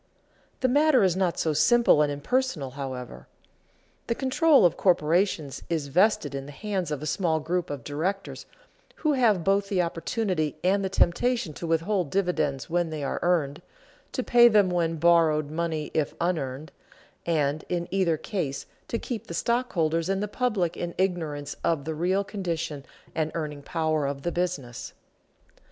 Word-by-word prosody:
The 260 Hz, -, +3 dB
matter 290 Hz, -1 st, +4 dB
is 185 Hz, -3 st, +3 dB
not 185 Hz, -3 st, 0 dB
so 160 Hz, -, 0 dB
simple 155 Hz, +3 st, +4 dB
and 150 Hz, -1 st, +2 dB
impersonal, 150 Hz, -, -1 dB
however. 125 Hz, -, -7 dB, 0.8 s
The 235 Hz, -, 0 dB
control 275 Hz, -, +4 dB
of 175 Hz, -, +3 dB
corporations 170 Hz, -4 st, +1 dB
is 155 Hz, -4 st, -2 dB
vested 180 Hz, -3 st, +2 dB
in 135 Hz, 0 st, -5 dB
the -, -, -8 dB
hands 190 Hz, +1 st, -3 dB
of 150 Hz, -1 st, -4 dB
a -, -, -3 dB
small 160 Hz, +1 st, 0 dB
group 175 Hz, +3 st, -2 dB
of 145 Hz, -4 st, -5 dB
directors 175 Hz, +9 st, -3 dB, 0.5 s
who 305 Hz, -2 st, +1 dB
have 225 Hz, -9 st, +3 dB
both 195 Hz, +1 st, +1 dB
the 185 Hz, -3 st, +2 dB
opportunity 170 Hz, -1 st, -2 dB
and 195 Hz, +2 st, +2 dB
the 190 Hz, -, -1 dB
temptation 195 Hz, +1 st, +1 dB
to 170 Hz, -, -6 dB
withhold 165 Hz, +1 st, 0 dB
dividends 155 Hz, -8 st, -1 dB
when 175 Hz, 0 st, 0 dB
they 155 Hz, -2 st, -4 dB
are 140 Hz, -, -2 dB
earned, 165 Hz, -4 st, 0 dB, 0.5 s
to 255 Hz, -, -1 dB
pay 240 Hz, 0 st, +6 dB
them 205 Hz, -5 st, +4 dB
with 165 Hz, -2 st, 0 dB
borrowed 155 Hz, -3 st, +3 dB
money 160 Hz, -2 st, -2 dB
if 155 Hz, -3 st, -1 dB
unearned, 155 Hz, -4 st, -2 dB, 0.6 s
and 155 Hz, -2 st, 0 dB
in 175 Hz, -1 st, -2 dB
either 185 Hz, -5 st, +2 dB
case 155 Hz, -, -3 dB, 0.2 s
to 230 Hz, -, -2 dB
keep 230 Hz, -2 st, -5 dB
the 170 Hz, -, -5 dB
stockholders 165 Hz, -10 st, 0 dB
and 195 Hz, +1 st, 0 dB
the -, -, -1 dB
public 205 Hz, -7 st, -1 dB
in 175 Hz, 0 st, -5 dB
ignorance 160 Hz, -6 st, -2 dB
of 155 Hz, -4 st, 0 dB
the 160 Hz, -, -2 dB
real 180 Hz, +5 st, +1 dB
condition 170 Hz, -8 st, -4 dB, 0.3 s
and 155 Hz, -1 st, -1 dB
earning 150 Hz, -3 st, -4 dB
power 155 Hz, -1 st, -1 dB
of 140 Hz, 0 st, -4 dB
the 175 Hz, -, -1 dB
business. 145 Hz, -9 st, -3 dB
170 Hz, 165 wpm, -26 LUFS, 150-195 Hz, 0.8 s, pay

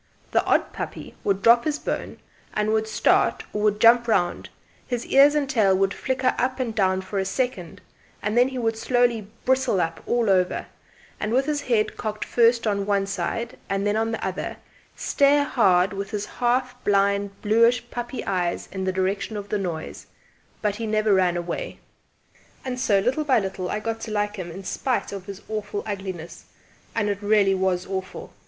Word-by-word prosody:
The -, -, +3 dB
odd -, -, +1 dB
puppy -, -, -6 dB
would 195 Hz, -1 st, 0 dB
drop 235 Hz, +1 st, +6 dB
his 300 Hz, -1 st, -1 dB
bone -, -, -4 dB, 0.4 s
with 215 Hz, +1 st, +1 dB
a -, -, -12 dB
start 215 Hz, -1 st, +2 dB
or 210 Hz, -, -2 dB
would 210 Hz, 0 st, +2 dB
jump 235 Hz, +2 st, +6 dB
round; 175 Hz, -6 st, 0 dB, 0.4 s
his 245 Hz, -2 st, -3 dB
ears 280 Hz, +2 st, +6 dB
and 290 Hz, -2 st, +1 dB
tail 210 Hz, -7 st, +3 dB
would 195 Hz, 0 st, +1 dB
flicker 260 Hz, 0 st, 0 dB
up 255 Hz, +1 st, 0 dB
and 240 Hz, -3 st, -2 dB
down 190 Hz, -3 st, +1 dB
for 195 Hz, +1 st, -4 dB
a -, -, +1 dB
second; 195 Hz, -5 st, -3 dB, 0.4 s
then 240 Hz, +5 st, +3 dB
he 265 Hz, -1 st, -5 dB
would 225 Hz, -2 st, 0 dB
slowly 240 Hz, -4 st, +1 dB, 0.2 s
bristle 260 Hz, -6 st, +2 dB
up 165 Hz, -1 st, -2 dB
all 240 Hz, -2 st, +1 dB
over, 185 Hz, -2 st, +2 dB, 0.5 s
and 210 Hz, -, -2 dB
with 260 Hz, +3 st, +2 dB
his 295 Hz, -1 st, -1 dB
head 230 Hz, -6 st, 0 dB
cocked 215 Hz, 0 st, -4 dB
first 235 Hz, 0 st, +3 dB
on 200 Hz, -2 st, 0 dB
one 200 Hz, -1 st, +2 dB
side 200 Hz, +5 st, -3 dB
and 195 Hz, 0 st, -1 dB
then 205 Hz, 0 st, +1 dB
on 225 Hz, +1 st, 0 dB
the 225 Hz, -, -3 dB
other, -, -, -4 dB, 0.4 s
stare 285 Hz, +1 st, +3 dB
hard 190 Hz, -8 st, +3 dB
with 195 Hz, 0 st, -4 dB
his 210 Hz, 0 st, -3 dB
half 250 Hz, +1 st, -1 dB
blind 200 Hz, 0 st, +1 dB
bluish 230 Hz, +3 st, +3 dB
puppy 240 Hz, +1 st, -5 dB
eyes 180 Hz, -3 st, -1 dB
in 190 Hz, -1 st, -4 dB
the 190 Hz, -, +1 dB
direction 190 Hz, +3 st, -1 dB
of 205 Hz, 0 st, -7 dB
the 210 Hz, -, 0 dB
noise; 170 Hz, -5 st, -5 dB, 0.6 s
but 205 Hz, -1 st, 0 dB
he 230 Hz, -, -3 dB
never 215 Hz, -1 st, +2 dB
ran 180 Hz, -2 st, +3 dB
away. 175 Hz, 0 st, -4 dB, 0.9 s
And 250 Hz, -1 st, -3 dB
so, 215 Hz, -6 st, +3 dB
little 260 Hz, +8 st, 0 dB
by 275 Hz, -3 st, +3 dB
little, 190 Hz, -3 st, -2 dB
I 210 Hz, -, -1 dB
got 225 Hz, +1 st, -4 dB
to 220 Hz, -, -6 dB
like 205 Hz, 0 st, -1 dB
him 180 Hz, -2 st, -5 dB
in 190 Hz, +4 st, -8 dB
spite 255 Hz, +6 st, -2 dB
of 195 Hz, -2 st, -7 dB
his 200 Hz, 0 st, -8 dB
awful 210 Hz, -1 st, -4 dB
ugliness. 190 Hz, -5 st, -6 dB, 0.5 s
And 220 Hz, -2 st, +1 dB
it 205 Hz, -1 st, -2 dB
really 205 Hz, -2 st, +3 dB
was 185 Hz, -1 st, 0 dB
awful! 190 Hz, -1 st, -6 dB
210 Hz, 190 wpm, -24 LUFS, 195-240 Hz, 0.9 s, drop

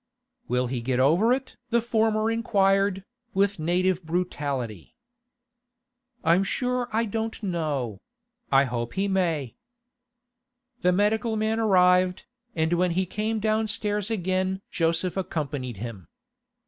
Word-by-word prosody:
'Will 125 Hz, 0 st, +1 dB
he 125 Hz, -1 st, -3 dB
get 125 Hz, +1 st, 0 dB
over 170 Hz, -, +4 dB
it?' 260 Hz, +1 st, -1 dB
the 235 Hz, -, +3 dB
former 220 Hz, -1 st, +1 dB
inquired, 195 Hz, -4 st, +2 dB, 0.3 s
with 200 Hz, -1 st, +2 dB
native 180 Hz, +2 st, +1 dB
brutality. 145 Hz, -, -3 dB, 1.3 s
'I'm 170 Hz, +3 st, +4 dB
sure 250 Hz, +3 st, -1 dB
I 225 Hz, +2 st, +1 dB
don't 225 Hz, +1 st, -4 dB
know; 145 Hz, -, -2 dB, 0.5 s
I 135 Hz, 0 st, +6 dB
hope 120 Hz, -2 st, -3 dB
he 195 Hz, +1 st, +1 dB
may.' 165 Hz, -, 0 dB, 1.3 s
The 180 Hz, -, +4 dB
medical 215 Hz, +4 st, +1 dB
man 220 Hz, +1 st, 0 dB
arrived, 180 Hz, -3 st, +3 dB, 0.3 s
and 160 Hz, +1 st, +1 dB
when 180 Hz, +1 st, +2 dB
he 190 Hz, -, +2 dB
came 215 Hz, +4 st, -2 dB
downstairs 210 Hz, -1 st, 0 dB
again 190 Hz, -2 st, -1 dB
Joseph 165 Hz, +2 st, 0 dB
accompanied 145 Hz, -, -3 dB
him. 105 Hz, -6 st, -7 dB
185 Hz, 120 wpm, -26 LUFS, 155-215 Hz, 1.3 s, I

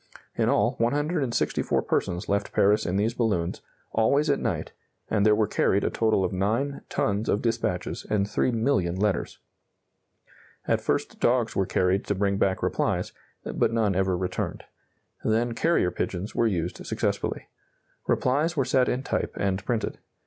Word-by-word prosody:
In -, -, +1 dB
all, -, -, +3 dB
164 145 Hz, +2 st, 0 dB
persons 90 Hz, +1 st, -1 dB
left 100 Hz, 0 st, -1 dB
Paris 105 Hz, +2 st, +3 dB
in 90 Hz, -, -1 dB
these 110 Hz, +3 st, +1 dB
balloons, 100 Hz, -8 st, -1 dB, 0.3 s
always 140 Hz, +7 st, +3 dB
at 140 Hz, -, +1 dB
night, -, -, -2 dB, 0.4 s
and 105 Hz, -2 st, +2 dB
there 105 Hz, 0 st, +5 dB
were 110 Hz, 0 st, +2 dB
carried 100 Hz, 0 st, +1 dB
a -, -, 0 dB
total 110 Hz, -4 st, +2 dB
of 90 Hz, -, -3 dB
9 115 Hz, +9 st, -1 dB
tons 105 Hz, +2 st, 0 dB
of 105 Hz, -, +1 dB
dispatches 115 Hz, 0 st, -1 dB
and 100 Hz, -2 st, +2 dB
3,000,000 105 Hz, -6 st, 0 dB
letters. 100 Hz, -4 st, 0 dB, 1.3 s
At -, -, +2 dB
first -, -, -1 dB
dogs 120 Hz, -2 st, +2 dB
were 95 Hz, -1 st, +1 dB
carried 95 Hz, +2 st, +1 dB
to 100 Hz, -, 0 dB
bring 100 Hz, 0 st, +1 dB
back 95 Hz, -2 st, +1 dB
replies, -, -, 0 dB, 0.3 s
but -, -, 0 dB
none 110 Hz, -3 st, +1 dB
ever 95 Hz, -1 st, +1 dB
returned. 90 Hz, 0 st, -3 dB, 0.6 s
Then 115 Hz, +2 st, +1 dB
carrier 160 Hz, -, +2 dB
pigeons 95 Hz, +4 st, -3 dB
were 115 Hz, -, +2 dB
used 90 Hz, -6 st, -2 dB
successfully. -, -, -2 dB, 0.6 s
Replies 150 Hz, +6 st, +1 dB
were 135 Hz, -, +2 dB
set 130 Hz, -1 st, +2 dB
in 130 Hz, +2 st, -1 dB
type -, -, -2 dB
and 95 Hz, 0 st, 0 dB
printed. 115 Hz, +1 st, -2 dB
105 Hz, 155 wpm, -26 LUFS, 95-120 Hz, 1.3 s, there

